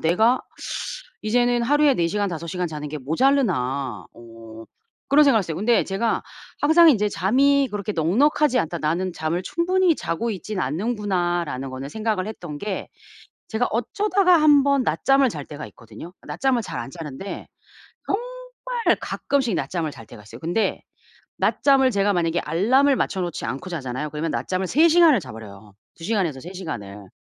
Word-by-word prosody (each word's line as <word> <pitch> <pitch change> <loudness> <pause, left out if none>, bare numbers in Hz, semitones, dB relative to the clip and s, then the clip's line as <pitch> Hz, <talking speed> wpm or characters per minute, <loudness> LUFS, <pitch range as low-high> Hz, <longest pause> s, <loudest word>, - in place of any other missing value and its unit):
내가 220 +10 +3 0.8
이제는 240 +2 +2
하루에 290 +2 +4
4 170 -5 +1
시간 205 +2 -1
5 170 0 -6
시간 180 +1 -2
자는 150 -2 -6
게 155 - -5
모자라나?' 140 - 0
어 115 -1 -12 0.4
그런 290 +2 +6
생각을 260 -6 +4
했어요. 165 -5 -4
근데 230 +4 +2
제가 210 +4 -1 0.4
항상 320 +3 +6
이제 210 -6 +2
'잠이 270 +10 +2
그렇게 210 0 -3
넉넉하지 255 - +2
않다. 160 - -3
나는 170 +4 -1
잠을 165 +3 -2
충분히 360 - +1
자고 220 +8 -2
있진 200 0 -5
않는구나.'라는 175 - -1
거는 130 +2 -7
생각을 215 -2 -2
했던 175 -9 -7
게 200 +3 -5 0.6
제가 235 +2 0
어쩌다가 365 - +2
1 290 -2 +6
번 280 -2 +2
낮잠을 270 - +2
잘 150 -5 -7
때가 150 0 -8
있거든요. 115 +9 -12
낮잠을 265 -3 0
잘 - - -6
안 120 +3 -6
자는데 160 +3 -7 0.6
정말 - - -2
가끔씩 265 -8 -1
낮잠을 165 -5 -2
잘 115 - -12
때가 105 - -13
있어요. 115 +3 -12
근데 175 +7 -1 0.6
낮잠을 270 -2 +3
제가 200 -1 +1
만약에 170 -1 0
알람을 255 - +2
맞춰 190 - -1
놓지 175 -3 -4
않고 135 +10 -5
자잖아요. 145 -2 -4
그러면 155 +1 -3
낮잠을 185 0 -2
3 320 +4 +5
시간을 325 - +5
자 130 -7 -10
버려요. 105 -2 -12 0.2
2 165 - -11
시간에서 180 -11 -1
3 180 +6 -9
시간을. 105 - -7
190 Hz, 340 characters per minute, -23 LUFS, -, 0.8 s, 그런